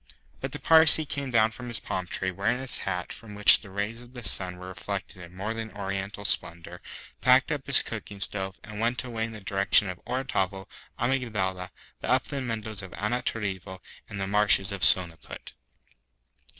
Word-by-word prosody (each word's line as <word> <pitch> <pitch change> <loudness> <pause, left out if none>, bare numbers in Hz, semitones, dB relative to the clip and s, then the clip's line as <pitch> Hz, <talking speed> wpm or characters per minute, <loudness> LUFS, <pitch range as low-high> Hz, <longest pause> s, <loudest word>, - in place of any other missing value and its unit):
But 135 - -5
the 145 - -5
Parsee 160 0 +8
came 140 -1 -4
down 110 -2 +3
from 125 +2 -9
his 120 -1 0
palm 90 -1 -5
tree, 95 +1 -3
wearing 105 +7 -1
his 130 0 -5
hat, 90 -2 -4
from 105 -2 -11
which 105 0 +8
the 100 - -13
rays 105 +4 -4
of 120 +1 -16
the 120 -3 -8
sun 90 -2 +3
were 90 +1 -9
reflected 95 +1 -7
in 90 0 -13
more 105 +4 -4
than 115 -1 -6
oriental 100 0 -5
splendour, 85 -1 -3 0.4
packed 130 +4 +4
up 145 -3 -4
his 140 - +3
cooking 105 -3 -8
stove, 95 -1 -4
and 105 -1 -9
went 120 +3 0
away 115 -3 -3
in 115 - -8
the 110 - -10
direction 100 +1 +3
of 90 - -12
Orotavo, 100 -7 -2 0.3
Amygdala, 105 -8 -2 0.3
the - - -6
Upland 135 -2 -1
Meadows 110 -3 -4
of 95 - -9
Anantarivo, 100 -4 -3 0.3
and 105 - -7
the 95 - -2
Marshes 100 -1 +4
of 100 -2 -6
Sonaput. 90 -4 +1
105 Hz, 180 wpm, -26 LUFS, 95-120 Hz, 0.4 s, Parsee